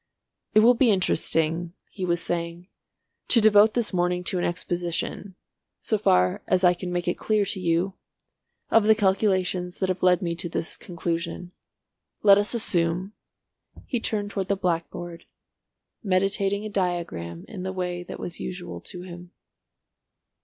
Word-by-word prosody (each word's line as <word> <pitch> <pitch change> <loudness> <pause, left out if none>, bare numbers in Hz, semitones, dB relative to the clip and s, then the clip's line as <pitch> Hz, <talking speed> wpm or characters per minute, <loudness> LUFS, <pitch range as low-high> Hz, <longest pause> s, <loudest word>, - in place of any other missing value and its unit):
"It 215 - +8
will 240 +3 +7
be 245 0 +3
interesting," 165 -3 +1 0.2
he 190 - -4
was 175 -1 +1
saying, 170 +1 -4 0.6
"to 240 - +5
devote 215 0 +6
this 235 -4 0
morning 180 0 0
to 180 0 0
an - - -1
exposition, 175 +2 -2 0.4
so 215 - -1
far 90 - +3
as 185 - +2
I 180 -1 +6
can 180 0 -6
make 175 0 -2
it 175 - -1
clear 215 -2 +1
to 195 0 -3
you, 175 +2 0 0.8
of 225 -2 +5
the 220 0 +6
calculations 190 -3 +1
that 190 - -1
have 185 0 -2
led 180 +1 +4
me 170 -1 -1
to 175 0 -3
this 165 - -3
conclusion. 170 0 -4 0.7
Let 200 -1 +7
us 205 +3 -1
assume—" 180 -2 0 0.7
He 245 - -2
turned 205 -2 -2
towards 190 -2 -3
the 200 - +2
blackboard, 175 -1 -3 0.8
meditating 195 +1 0
a - - -4
diagram 170 - -3
in 195 - -8
the 190 +1 -3
way 180 -1 -3
that 175 - -8
was 175 - -6
usual 180 -1 -6
to 180 -1 -9
him. 175 -1 -10
180 Hz, 155 wpm, -25 LUFS, 175-200 Hz, 0.8 s, It